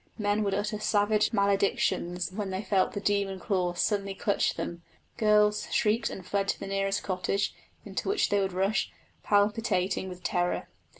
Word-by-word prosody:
Men 205 -1 +1
would 200 -2 0
utter 210 +1 -2
savage 210 0 +2
maledictions 195 -3 +1
when 200 0 -4
they 190 +2 -3
felt 195 -3 +1
the 205 - -3
demon 200 -2 0
claws 180 -3 -1
suddenly 200 -2 0
clutch 200 +1 +1
them; 170 0 -5 0.3
girls 210 -2 +3
shrieked 220 +2 +2
and 185 - -8
fled 195 +1 -1
to - - -1
the - - -5
nearest 195 0 -1
cottage, 195 +1 -1 0.3
into - - -3
which 405 - +2
they 205 - +2
would 195 -1 0
rush, 195 +3 0 0.3
palpitating 205 -3 +1
with 180 0 -10
terror. 175 -3 0
200 Hz, 165 wpm, -28 LUFS, 190-210 Hz, 0.3 s, girls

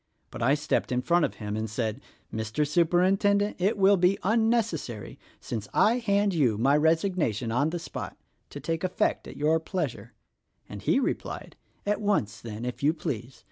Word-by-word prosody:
But - - -7
I 130 +5 +4
stepped 150 -3 -1
in 125 0 0
front 170 0 +3
of - - -5
him 105 -1 -5
and 110 0 -3
said, 110 +3 -2 0.3
'Mr. 110 +7 -1
Superintendent, 190 +6 +2
it 195 +4 +1
will 195 0 +5
be 180 +2 +3
unnecessary, 220 - 0 0.2
since 110 -4 -5
I 235 +3 +4
hand 205 -3 +1
you 130 -10 +2
my 135 +6 +3
resignation 160 - +1
on 140 +6 +2
the 175 - -3
spot 165 - -7 0.2
— - - -45
to 145 - -8
take 165 +4 -3
effect 185 - 0
at - - -10
your 155 +2 +2
pleasure,' 160 -5 -4 0.5
and 105 -1 -8
he 260 - +2
replied, 270 - -3 0.3
'At 210 +1 0
once, 105 - 0
then, 115 0 -6
if 125 - -5
you 150 +3 +3
please. 125 -5 -5
155 Hz, 180 wpm, -27 LUFS, 120-195 Hz, 0.5 s, will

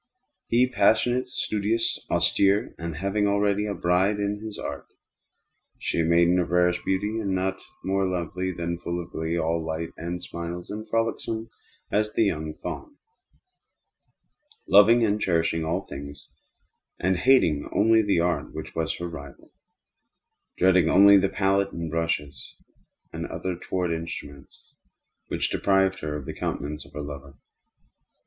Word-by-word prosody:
He, 120 +2 +3
passionate, 125 +1 +2
studious, 110 -1 -1
austere, 95 +5 +2
and 85 -1 -4
having 100 +5 0
already 100 +1 +1
a 100 - -2
bride 95 +4 +2
in 105 0 -2
his 110 -2 -6
Art; - - -6 0.9
she - - -2
a - - +3
maiden 85 +2 +4
of 90 - -1
rarest 90 0 +3
beauty, 105 +4 -1
and 100 -3 -1
not 95 +1 -1 0.2
more 95 0 +1
lovely 90 +1 -2
than 85 0 -4
full 85 0 -3
of 85 - -8
glee; 80 +1 -2
all 80 0 0
light 80 +1 -3
and 85 +1 -4
smiles, 85 +1 -6
and 110 +1 -6
frolicsome 115 0 -2 0.4
as 105 +1 +1
the - - +3
young 80 -6 -2
fawn; 300 -4 -6 1.7
loving 115 +4 +6
and 105 0 0
cherishing 85 -3 +1
all 85 +5 -1
things; 70 +1 -9 0.7
hating 90 - +3
only 110 +2 +4
the 100 -5 +1
Art 85 -4 -1
which - - -7
was 80 -1 -1
her 85 - -4
rival; 70 -4 -10 1.1
dreading 90 -3 +4
only 100 +2 +8
the 95 0 +2
pallet 100 0 +1
and 85 -2 -4
brushes 75 -5 -3 0.6
and 80 0 -4
other 95 - -4
untoward 90 0 -2
instruments 75 -4 -7 0.5
which - - -2
deprived 95 -1 +2
her 75 -1 -4
of 70 - -8
the - - -5
countenance 75 +2 -4
of - - -20
her 75 - -5
lover. 70 -1 -9
90 Hz, 145 wpm, -25 LUFS, 80-100 Hz, 1.7 s, only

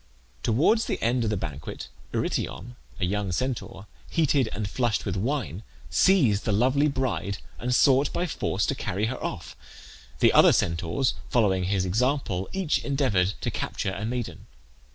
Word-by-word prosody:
Towards 155 - +3
the - - -2
end 120 +1 +1
of 110 - 0
the 105 - 0
banquet 75 -5 -6 0.2
Eurytion, 120 +7 -3 0.2
a 90 - +1
young 100 +1 -1
Centaur, 120 -2 -3 0.2
heated 145 -7 +2
and 105 +1 -3
flushed 120 0 -1
with - - -2
wine, 105 - -2 0.3
seized 130 - +4
the 110 - 0
lovely 130 +8 +3
bride 130 -8 -1 0.2
and 125 - -2
sought 135 +2 +4
by 175 - -1
force 170 - -1
to - - 0
carry 100 +4 -2
her 125 +3 -4
off. - - -5 0.6
The - - +4
other - - +7
Centaurs, 85 +10 0 0.2
following 95 -6 +2
his 95 0 0
example, 105 -2 0
each 190 -5 0
endeavoured 105 -10 +1
to - - -1
capture 95 - -3
a 100 - -5
maiden. 120 +1 -4
115 Hz, 155 wpm, -26 LUFS, 95-135 Hz, 0.6 s, other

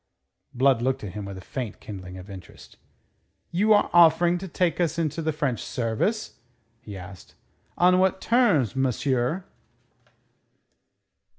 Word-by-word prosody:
Blood 130 -1 +2
looked 130 -1 -1
at 100 - -5
him 105 +1 -6
with 100 -1 -7
a - - -9
faint 130 -1 -6
kindling 95 -3 -9
of 90 +1 -11
interest. 95 -2 -12 0.8
"You 205 +6 +2
are 205 -1 +5
offering 170 +1 +5
to 190 - -7
take 180 0 -1
us 165 -1 0
into 165 0 -1
the 160 0 0
French 145 -5 -2
service?" 130 - -2 0.4
he 105 -2 -9
asked. 90 0 -12 0.4
"On 180 +1 +4
what 190 0 +2
terms, 205 - +2
monsieur?" 135 - 0
140 Hz, 135 wpm, -25 LUFS, 110-175 Hz, 0.8 s, are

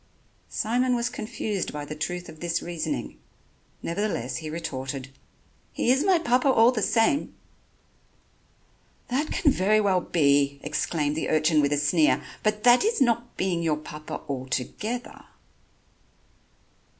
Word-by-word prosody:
Simon 250 +3 +1
was 235 0 0
confused 215 -3 -3
by 145 -1 -5
the 155 - -6
truth 175 +3 -4
of 155 - -12
this 170 0 -1
reasoning, 175 - -4 0.6
nevertheless 165 - -2
he 155 +4 -6
retorted: 135 -4 -5 0.6
"He 245 - +2
is 265 +3 +3
my 375 -1 +4
Papa 255 -5 +2
all 235 -2 +6
the 230 -4 -2
same." 225 +7 +1 1.7
"That 280 +5 0
can 290 - +2
very 215 0 +3
well 195 -3 +2
be," 140 -4 +2
exclaimed 150 0 -1
the 160 - -2
urchin 155 0 +3
with 140 0 +1
a 145 - +2
sneer, 145 -2 +3 0.2
"but 215 0 0
that 245 0 +6
is 445 -1 +1
not 240 -2 +1
being 180 -3 0
your 160 -3 +1
Papa 150 0 -7
altogether." 140 - -4
175 Hz, 135 wpm, -26 LUFS, 150-235 Hz, 1.7 s, all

